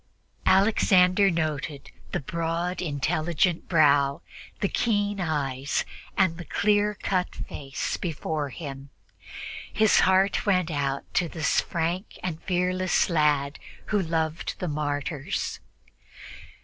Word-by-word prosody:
Alexander 190 -1 +5
noted 155 -4 -3 0.2
the - - -1
broad, 170 +4 -2
intelligent 165 +3 0
brow, 140 -4 +4 0.4
the 200 - +1
keen 205 -2 0
eyes 140 -4 -1 0.3
and 175 -4 +2
the - - -5
clear 205 +4 +1
cut 185 -2 -1
face 135 -1 -4
before 155 -3 -3
him. 140 -2 -8 0.8
His 215 -1 +4
heart 190 +1 +3
went 185 -4 +2
out 140 -2 -1
to 175 -2 +1
this 155 -3 +1
frank 170 +4 -3
and 165 -3 -3
fearless 185 0 +1
lad 150 -3 +2 0.3
who 205 - +3
loved 160 -2 -2
the 180 - -3
martyrs. 145 -1 -2
165 Hz, 110 wpm, -26 LUFS, 145-185 Hz, 0.8 s, Alexander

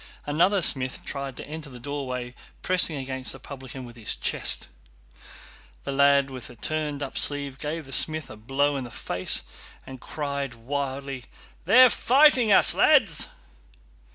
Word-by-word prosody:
Another 175 +6 +2
smith 130 -3 +2
tried 140 -2 -4
to - - -8
enter 155 0 -7
the 125 -2 -11
doorway, 130 -2 -5 0.3
pressing 180 -3 +3
against 130 -1 -4
the 135 - -11
publican 130 -1 -9
with 120 -1 -12
his 115 -3 -2
chest. - - 0 1.2
The - - -4
lad 140 0 +3
with 130 -3 -7
the - - -13
turned 150 +2 -3
up 135 - -3
sleeve 140 -2 -1
gave 155 +1 -4
the 135 - -13
smith 155 +2 +2
a - - -9
blow 140 +6 0
in 135 - -4
the 120 - -8
face 90 -5 -2 0.4
and 130 -1 -10
cried 140 -4 -4
wildly: 135 +1 -4 0.4
"They're 255 0 +7
fighting 260 -4 +4
us, - - +5
lads!" - - +3
140 Hz, 155 wpm, -25 LUFS, 130-150 Hz, 1.2 s, They're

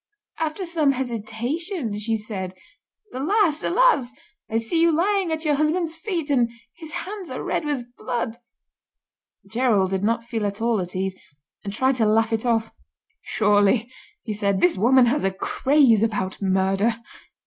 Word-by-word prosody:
After 320 +4 -2
some 315 -5 +2
hesitation, 245 - -3
she 220 +2 -1
said: 195 -4 -5 0.6
'Alas! 315 +3 +1
alas! 365 - +3 0.4
I 225 - 0
see 230 +9 0
you 335 0 +5
lying 370 +2 +1
at 320 0 -3
your 300 - +3
husband's 315 +3 +1
feet, 330 -3 -3
and 245 -4 +3 0.3
his 320 -2 -9
hands 390 -2 -7
are - - -5
red - - -1
with 245 -5 -4
blood.'" 235 -1 -3 1.1
Gerald 215 -4 +1
did 190 0 -1
not 230 +2 +1
feel 230 -3 -2
at 200 0 -5
all 230 -3 +1
at 180 0 -5
ease, 190 0 -1 0.5
and 200 - -4
tried 260 +5 +1
to 220 -3 +2
laugh 225 +1 +2
it 225 +2 -1
off. 225 -1 +1 0.5
"Surely," 210 +3 +2 0.3
he 215 - -3
said, 200 -2 0
"this 180 0 +3
woman 245 +6 +5
has 260 +5 +1
a 195 - +3
craze 235 +4 +3
about 205 -4 -1
murder." 195 +4 +1
235 Hz, 160 wpm, -23 LUFS, 210-305 Hz, 1.1 s, you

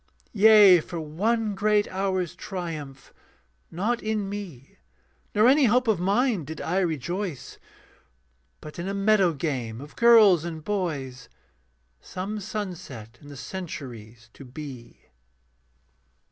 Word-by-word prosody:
Yea, 210 -4 +7
for 170 +2 -7
one 210 +8 -1
great 210 +1 +1
hour's 185 -2 -2
triumph, 165 -8 -7 0.6
not 220 +8 -2
in 215 -2 -2
me 185 - -8 0.6
Nor 215 +3 +5
any 275 +2 +5
hope 250 +2 +2
of 215 -5 +2
mine 205 - +1
did 155 +3 -8
I 180 +4 -1
rejoice, 175 -1 -3 1.0
But 150 +2 -10
in 175 - -4
a 195 - -3
meadow 195 -3 +3
game 130 -7 -4
of 145 +3 -11
girls 220 -8 +6
and 160 -2 -6
boys 145 - -4 0.7
Some 195 - -6
sunset 175 - -7
in 145 - -14
the 145 -1 -10
centuries 120 - -8
to - - -12
be. 130 -2 -10
180 Hz, 120 wpm, -25 LUFS, 145-205 Hz, 1.0 s, Yea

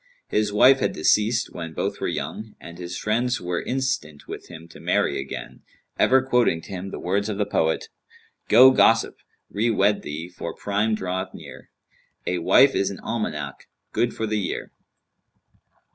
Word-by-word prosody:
His 105 -1 +1
wife 130 +6 +6
had - - 0
deceased 110 +8 +2
when 80 -2 -7
both - - -3
were - - 0
young; 110 0 -5
and 85 +1 -11
his 90 0 -5
friends 120 +3 0
were 90 0 -2
instant 130 - -3
with - - -8
him 85 -1 -11
to - - -13
marry - - +1
again, 70 0 -7 0.4
ever 130 0 +5
quoting 125 -10 +2
to - - -14
him 95 0 -5
the - - -6
words 100 +4 -1
of 105 - -3
the 105 - +1
poet, 80 -5 0 0.6
"Go, 130 +4 +8
gossip! 115 -3 +3 0.3
re 110 +4 +1
wed 105 -1 +2
thee, 80 +3 -6
for 90 - -7
Prime 105 +2 0
draweth 95 -1 -4
near: - - -12 0.6
A 90 0 -1
wife 135 +10 +5
is 100 - +1
an 100 - -7
almanac—good 105 - -4
for 110 - -2
the 105 -1 -1
year." 100 - -4
100 Hz, 165 wpm, -24 LUFS, 90-115 Hz, 0.6 s, Go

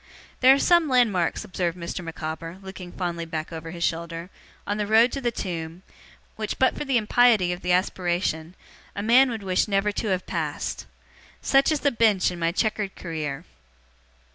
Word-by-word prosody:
'There 260 +1 +7
are - - 0
some 345 +1 +4
landmarks,' 220 -10 +2
observed 175 -1 -2
Mr. 175 +1 -5
Micawber, 165 +1 -6
looking 185 -2 -9
fondly 175 -2 -3
back 160 0 -5
over 165 0 -6
his 170 0 -5
shoulder, 170 +2 -3 0.3
'on 205 +1 -2
the 210 -1 -2
road 225 +3 +5
to 275 - -4
the 240 - +1
tomb, 170 -5 -5 0.5
which, 215 -1 -3
but 260 - +3
for - - -3
the 270 -3 +1
impiety 220 -4 +4
of 175 - -8
the 180 - -1
aspiration, 175 -2 0 0.4
a 200 - -3
man 250 +4 +5
would 225 -4 -5
wish 185 +1 +1
never 200 0 +1
to 215 - -3
have 185 -2 -1
passed. - - -3 0.6
Such 275 +2 +4
is 305 - 0
the 285 - +2
Bench 220 -6 +3
in 175 - -7
my 165 0 +1
chequered 210 0 -1
career. 155 -2 -5
185 Hz, 180 wpm, -25 LUFS, 170-225 Hz, 0.6 s, There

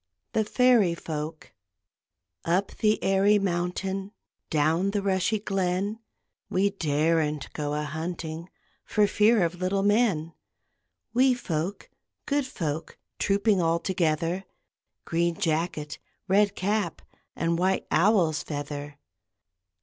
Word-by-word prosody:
THE 220 - +2
FAIRY 225 -6 +4
FOLK 155 -1 -6 0.9
Up 180 +4 +1
the 215 0 +2
airy 195 +2 +4
mountain, 190 +1 -2 0.4
Down 160 +5 +2
the 200 0 -1
rushy 190 +2 +1
glen, 195 +1 -1 0.5
We 195 +2 +2
daren't 155 -3 0
go 145 -1 -2
a 150 - -1
hunting 160 +2 -5 0.3
For 210 -1 +2
fear 210 0 +4
of 175 +2 -4
little 195 +2 +1
men; 200 -7 +2 0.8
Wee 255 +1 +4
folk, 175 -4 -3 0.4
good 285 -2 0
folk, 160 - -4 0.2
Trooping 200 -1 +2
all 165 0 +2
together; 170 +1 -1 0.6
Green 170 0 0
jacket, 155 -2 -2 0.3
red 200 +1 +3
cap, 205 -3 -1 0.3
And 165 0 0
white 190 +1 +1
owl's 175 -5 +3
feather! 145 -1 -6
180 Hz, 110 wpm, -27 LUFS, 160-200 Hz, 0.9 s, FAIRY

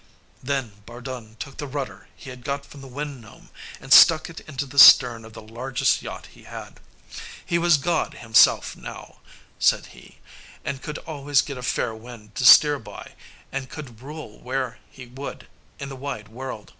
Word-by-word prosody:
Then 125 -6 -4
Bardun 120 -2 -9
took 135 +4 -8
the 145 - -5
rudder 140 -1 -6
he 130 - -11
had 125 -1 -12
got 140 +1 -4
from 140 0 -14
the 135 - -11
Wind 140 0 -6
Gnome, 110 -1 -17 0.3
and - - +1
stuck - - +7
it - - -9
into 140 -2 -6
the 140 +1 -1
stern 120 -3 +8
of 110 0 -13
the 110 - -11
largest 125 +3 -1
yacht - - -8
he - - -18
had. - - -10 0.7
He 170 - 0
was 170 -2 +4
God 160 +2 -1
himself 115 -4 +3
now, - - -11 0.4
said - - +3
he, - - -17 0.5
and 135 -1 -4
could 150 +2 -6
always 145 -2 0
get 140 -4 -7
a - - -7
fair 120 -1 -1
wind 110 -2 -13
to - - -3
steer 145 0 +8
by, - - -11 0.4
and 135 -1 -5
could 125 -7 -10
rule 145 -6 -10
where 130 -1 -4
he 130 - -12
would 130 +3 -9 0.3
in 140 - -7
the 135 - -8
wide 130 -6 -6
world. 120 -2 -8
130 Hz, 180 wpm, -23 LUFS, 120-140 Hz, 0.7 s, stern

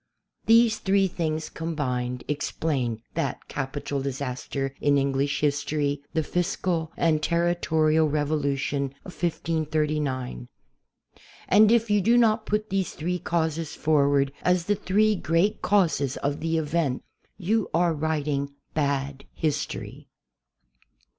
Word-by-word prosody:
These 225 0 +5
three 195 0 +2
things 160 -3 -2
combined 125 -7 -3
explain 135 -5 -2
that - - -3
capital 140 0 -3
disaster 135 0 -3
in 145 -1 +3
English 140 +1 0
history, 145 0 0
the 160 - +2
fiscal 175 -1 -1
and 160 -2 +2
ter 170 +2 +1
ritorial 155 -2 +2
revolution 140 -2 -1
of 185 - -9
1539. 150 - -1 1.0
And 210 +2 +6
if 230 -2 +3
you 205 -1 +4
do 230 +5 +4
not 220 -2 +3
put 210 0 -1
these 195 -1 -1
three 180 +3 -2
causes 160 -2 -1
forward 140 -2 +2
as 180 -1 +2
the 205 - +2
three 215 +3 +2
great 180 +4 +1
causes 160 -9 +2
of 140 +1 -2
the 165 +1 0
event, 155 -4 -1 0.3
you 215 +3 0
are 170 0 +2
writing 145 -2 -2 0.2
bad 140 -2 -1
history. 155 -2 -3
155 Hz, 120 wpm, -26 LUFS, 140-175 Hz, 1.0 s, And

